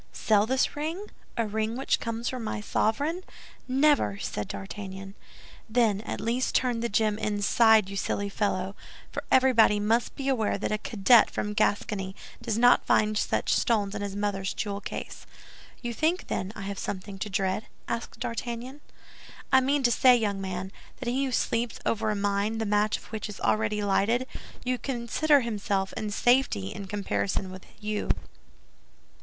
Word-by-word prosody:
"Sell 210 -1 +2
this 260 +2 +1
ring, 325 +8 -4 0.3
a 230 - +1
ring 220 +2 -2
which 270 - +1
comes 230 +1 -3
from 255 -2 -3
my 215 - -3
sovereign? 285 - 0 0.4
Never!" 265 - +3
said 105 0 -4
D'Artagnan. 195 -1 -7 0.6
"Then, 220 -3 +2
at - - -3
least 240 +3 -1
turn 245 -2 +2
the 235 +1 -1
gem 215 0 +1
inside, 215 0 +4
you 200 - -7
silly 200 +1 -1
fellow; 195 -1 -1 0.4
for - - -4
everybody 240 -5 +5
must 225 +3 +1
be 275 - -4
aware 230 -7 +1
that 200 - -3
a 215 - 0
cadet 220 +2 +5
from 210 - -3
Gascony 205 -2 0 0.3
does 230 -2 -1
not 245 +1 +6
find 215 0 +2
such - - +1
stones 210 -4 +1
in 210 - -4
his 200 -1 -4
mother's 200 -2 -2
jewel 200 -1 -3
case." - - -7 0.6
"You 240 0 -2
think, 320 +8 0
then, 190 +2 -2
I - - -7
have 195 0 -5
something 195 0 -5
to 210 - -3
dread?" 190 +2 -1 0.2
asked 230 0 -4
D'Artagnan. 240 +4 -4 0.7
"I 265 - +7
mean 275 +2 +1
to 240 - +4
say, 250 0 +6
young 205 -4 -1
man, 190 0 -4 0.3
that 250 - -3
he 265 +3 +1
who 265 - -2
sleeps 230 -1 0
over 225 -1 0
a 210 - 0
mine 205 +2 0
the 225 - -1
match 210 0 +2
of - - -15
which 220 -1 -4
is 210 - -8
already 210 -1 +1
lighted, 205 +5 +2 0.4
may 250 0 0
consider 275 +4 +2
himself 200 -4 -1
in 215 - -3
safety 240 - +2
in 195 - -7
comparison 195 -1 -2
with 185 0 -11
you." 210 0 -3
215 Hz, 170 wpm, -27 LUFS, 200-240 Hz, 0.7 s, I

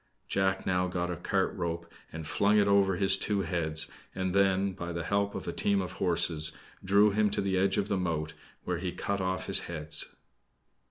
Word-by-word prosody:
Jack 95 0 0
now 90 0 +1
got 90 0 -2
a - - -2
cart 95 +3 0
rope 85 -2 -3 0.3
and 80 0 -6
flung 100 +6 +2
it 100 -1 +4
over 100 -1 +4
his 95 +1 +4
two 100 0 0
heads, 80 -3 0 0.3
and 95 -1 -1
then, 95 0 +3
by 85 -2 -5
the 85 0 -3
help 100 +2 0
of - - -6
a - - -2
team 100 -1 +2
of 90 -2 -3
horses, 85 -4 +1 0.3
drew 100 +2 +5
him 105 +1 +2
to 105 - -1
the 95 -1 0
edge 95 +1 +2
of 100 -1 0
the 100 -2 0
moat, 80 -4 -2 0.3
where 90 -2 -2
he 90 0 -3
cut 100 +2 -2
off 95 0 -2
his - - +3
heads. 75 -2 -4
95 Hz, 205 wpm, -30 LUFS, 85-100 Hz, 0.3 s, drew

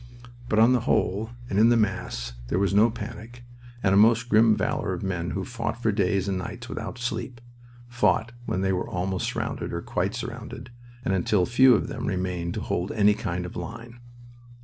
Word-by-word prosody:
But 105 - +1
on 115 +3 +6
the 125 - +3
whole, 110 -1 0 0.2
and 100 -3 0
in 115 +2 +6
the 120 - +4
mass, - - -2
there 85 - 0
was 100 0 +1
no 105 +3 +5
panic, 115 +2 -8 0.4
and 95 - +3
a - - +5
most 115 +3 +5
grim 110 0 +5
valor - - -1
of - - -5
men 90 -3 -2
who 95 -1 -3
fought 115 -1 -4
for 110 -2 +1
days 100 -1 +1
and 95 -2 -1
nights 90 - -7
without - - -6
sleep; 125 0 -4 0.5
fought 120 -1 +1 0.2
when 95 - -1
they 95 0 +1
were 90 - -2
almost 95 +1 -2
surrounded - - -3
or - - -3
quite - - -1
surrounded, 125 +1 -7 0.3
and 95 - +1
until 95 0 +2
few 125 +1 +6
of - - -1
them - - -5
remained 90 -3 -2
to - - -3
hold 90 +2 -2
any 105 -1 +4
kind 90 -4 -3
of 90 - -8
line. 115 +7 -7
105 Hz, 195 wpm, -26 LUFS, 95-115 Hz, 0.5 s, on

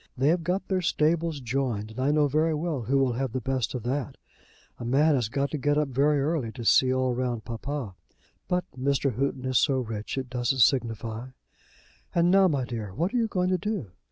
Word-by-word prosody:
They 135 +3 +3
have 170 +1 +2
got 185 +3 -1
their 190 -1 0
stables 165 -2 +1
joined, 120 -4 -2
and 110 - -9
I 130 +2 +2
know 150 0 +3
very 155 +3 +1
well 155 -3 -2
who 130 +5 +1
will 135 -2 +2
have 130 -1 -2
the 130 - -1
best 130 -2 -2
of 125 - -4
that. 130 0 -3 0.6
A - - -6
man 140 +6 +3
has 120 -6 0
to 140 +4 -1
get 145 +2 +1
up 150 -2 +1
very 140 +3 +2
early 140 -5 -1
to 120 -3 -7
see 130 +3 +5
all 130 -1 +1
round 120 -2 -2
papa. 115 -1 -4 0.5
But 180 0 0
Mr. 140 0 0
Houghton 130 +2 -2
is 130 -2 +3
so 135 -3 +2
rich, 110 -1 -4
it 130 -1 -2
doesn't 125 +1 -1
signify. 115 -1 +1 0.9
And 175 +1 +4
now, 195 0 +6
my 140 -7 0
dear, 110 -6 -6
what 170 - -1
are - - +1
you 230 -2 +2
going 185 -3 0
to 185 - +1
do? 200 - -3
135 Hz, 215 wpm, -27 LUFS, 120-155 Hz, 0.9 s, now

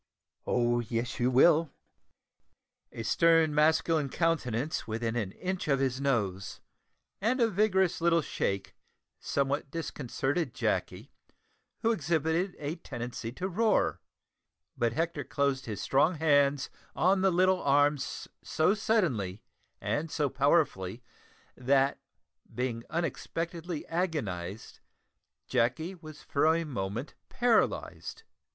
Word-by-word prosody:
"Oh, 120 -1 +2
yes, 120 +2 -3
you 125 +1 +3
will!" 155 +5 +5 1.2
A 115 - -6
stern 165 +3 +4
masculine 155 -1 +3
countenance 150 -5 -1
within 115 +1 -2
an 105 -6 -2
inch 185 -2 -4
of 140 -2 +2
his 135 -1 0
nose, 100 -9 -1 0.6
and 240 +6 +1
a 230 - +4
vigorous 190 -4 +2
little 170 -1 +3
shake, 100 -6 -2 0.4
somewhat 140 +1 -1
disconcerted 145 -2 -3
Jacky, - - -2 0.7
who 225 - +4
exhibited 165 0 0
a 150 +3 -4
tendency 120 -6 -6
to 185 +7 -3
roar; 215 +4 +1 0.7
but 115 -1 0
Hector 160 -1 -1
closed 140 -1 -1
his 105 -3 -4
strong 150 +6 +2
hands 145 -3 +2 0.2
on 190 +2 +3
the 195 - +4
little 185 +1 +3
arms 145 0 +1 0.2
so 160 +5 +2
suddenly 155 - 0 0.4
and 160 +2 -2
so 150 -2 0
powerfully, 130 - +1 0.5
that, 135 +2 +2 0.5
being 120 -2 -3
unexpectedly 170 0 -3
agonised, 110 - -3 0.7
Jacky 130 +9 0
was 155 -4 -12
for 140 +2 +1
a 165 - 0
moment 115 -3 -4 0.2
paralysed. 245 - 0
145 Hz, 110 wpm, -30 LUFS, 125-170 Hz, 1.2 s, will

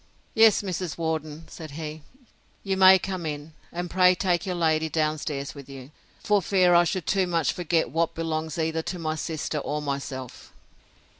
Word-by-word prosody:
Yes, 220 -2 +5
Mrs. 180 -3 -4
Worden, 160 -1 -3
said 160 -2 -9
he, 155 -1 -6 0.6
you 195 -1 -1
may 190 0 +8
come 185 -1 -4
in; 150 0 -5 0.2
and 175 +1 -4
pray 180 +1 +4
take 180 +1 0
your 180 - -1
lady 160 -2 +1
down 155 -1 0
stairs 140 -2 -4
with 140 -2 -12
you, 135 0 -10 0.3
for 210 -1 +3
fear 185 0 +3
I 175 0 +6
should 175 +1 -2
too 190 -2 +1
much 165 -5 +1
forget 165 -6 0
what 165 +2 0
belongs 160 -1 -3
either 160 0 0
to 180 - -5
my 160 -2 -2
sister 155 -1 -3
or 150 +1 -3
myself! 140 -3 -5
160 Hz, 175 wpm, -26 LUFS, 155-180 Hz, 0.6 s, may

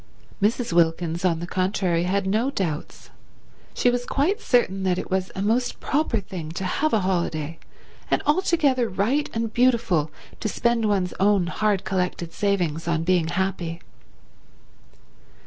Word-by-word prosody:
Mrs. 225 0 +1
Wilkins, 170 0 +1
on 170 -3 +1
the - - -3
contrary, 185 -2 0
had 195 +2 0
no 220 +7 +1
doubts. 175 - -4 0.6
She 245 - +3
was 245 0 -1
quite 325 - 0
certain 195 -6 +2
that 185 -1 +1
it - - -5
was 190 0 0
a 190 - -2
most 240 +4 0
proper 285 -6 0
thing 180 -5 -7
to 190 - -4
have 310 +11 0
a 220 - +2
holiday, 165 -4 -1 0.5
and - - +1
altogether 295 -7 +2
right 220 +10 0
and 225 -1 -3
beautiful 230 -11 +2 0.3
to 215 - -2
spend 235 +1 +1
one's 195 -4 +1
own 200 -2 +3
hard 205 +2 0
collected 180 -3 -2
savings 175 -6 -1
on 165 -1 +1
being 175 -2 +2
happy. 175 -1 -2
190 Hz, 145 wpm, -24 LUFS, 175-230 Hz, 0.6 s, She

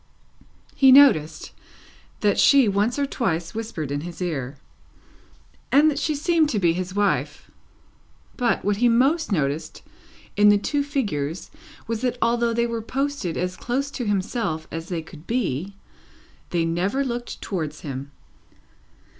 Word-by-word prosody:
He 265 -1 +6
noticed 165 - +5 0.7
that 205 -1 +2
she 275 -4 +6
once 205 +5 +1
or 285 - +1
twice 170 -11 -2
whispered 215 -10 -5
in 145 0 -2
his 170 0 -8
ear, 145 -6 -3 1.1
and 300 +3 +5
that 285 - -3
she 310 - -1
seemed 320 +1 +2
to 230 - -1
be 170 -3 +3
his 185 +2 -4
wife; 205 -1 -1 0.8
but, 245 -6 0
what 205 0 +1
he 240 +2 +3
most 270 +6 +2
noticed 150 -4 -2 0.5
in 205 0 +6
the 205 - +6
two 285 +8 -1
figures 200 - -3 0.3
was, 230 0 -3
that 250 -1 -1
although 235 0 +1
they 235 +1 +1
were 230 -1 -3
posted 270 - -3
as 180 0 -2
close 270 +7 -2
to 245 - -4
himself 190 -5 -2
as 165 +1 -6
they 170 -3 -3
could 160 0 -14
be, 195 - -2 0.7
they 170 -2 0
never 185 +11 0
looked 240 -1 -5
towards 155 -7 -4
him. 140 -2 -6
205 Hz, 145 wpm, -23 LUFS, 165-255 Hz, 1.1 s, He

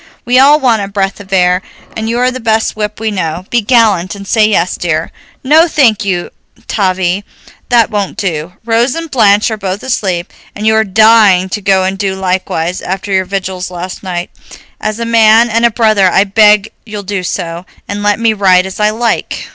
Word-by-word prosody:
We 250 +1 +3
all 290 +3 +5
want 240 -6 +1
a 200 - -4
breath 195 -1 -2
of 200 -1 -13
air, 180 -1 +2 0.3
and 220 0 -3
you 235 - -1
are 250 +1 +1
the 255 - -6
best 220 -1 0
whip 210 -1 -4
we 220 0 -2
know. 180 -2 -3
Be 240 - +2
gallant 210 -6 +2
and 200 0 -10
say 215 0 +3
yes, 185 -4 0
dear." 165 -2 -2 0.3
"No, 310 +5 +4
thank 250 -11 +2
you, 180 -3 -2 0.4
Tavie, 185 -1 -1 0.5
that 235 -2 +3
won't 205 -2 -3
do. 170 -3 -3
Rose 235 +2 +1
and 330 -2 -6
Blanche 210 -3 +3
are 220 - -3
both 195 -1 -4
asleep, 190 -9 -2 0.2
and 210 - -5
you 220 - +3
are 220 0 +3
dying 210 -2 +4
to 210 - -4
go 190 -1 +2
and 190 +1 -2
do 195 -2 -1
likewise, 185 -2 -2
after 190 +2 -5
your 190 0 +1
vigils 185 -1 -4
last 180 +1 -7
night. 180 -2 -5 0.5
As 215 +1 -3
a 235 - -2
man 230 0 +4
and 230 +2 +2
a - - -1
brother 215 -4 +2
I 190 - +3
beg 210 +1 +3
you'll 210 -2 -7
do 195 -1 -3
so, 170 0 -5 0.2
and 205 0 -4
let 205 +1 +1
me 230 -1 +2
ride 190 -3 +3
as 190 +1 -8
I 210 0 +3
like." 230 +2 -2
205 Hz, 205 wpm, -12 LUFS, 185-225 Hz, 0.5 s, all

